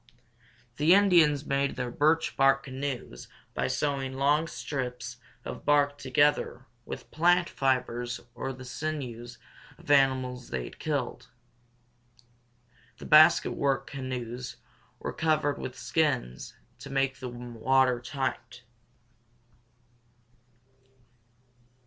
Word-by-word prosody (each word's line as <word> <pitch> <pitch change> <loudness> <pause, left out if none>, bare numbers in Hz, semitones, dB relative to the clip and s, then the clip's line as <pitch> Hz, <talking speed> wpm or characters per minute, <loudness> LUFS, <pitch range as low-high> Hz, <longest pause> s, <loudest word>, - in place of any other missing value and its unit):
The 160 +5 +6
Indians 165 -8 +4
made 140 0 0
their 125 -1 -3
birch 155 +5 +2
bark 135 0 +4
canoes 130 - -5 0.3
by - - -1
sewing 135 -3 -1
long 145 +4 +2
strips 125 -6 -5 0.3
of - - -7
bark 145 -1 +2
together 130 -1 +1 0.2
with - - -8
plant 175 +2 +3
fibers 120 -2 -1
or 130 +2 -4
the 130 0 -10
sinews 125 -4 -5 0.4
of - - -17
the 145 - +5
animals 130 -2 +1
they 65 - -3
had - - -10
killed. 145 -5 -3 1.7
The - - -10
basket 155 +1 +6
work 140 -1 0
canoes 125 -2 -5 0.4
were - - -5
covered 155 -2 +1
with 125 - -6
skins 135 - -1 0.2
to 140 - -9
make 135 -1 0
them 120 -1 -7
water 125 +1 +2
tight. 130 0 -4
135 Hz, 105 wpm, -28 LUFS, 125-145 Hz, 1.7 s, The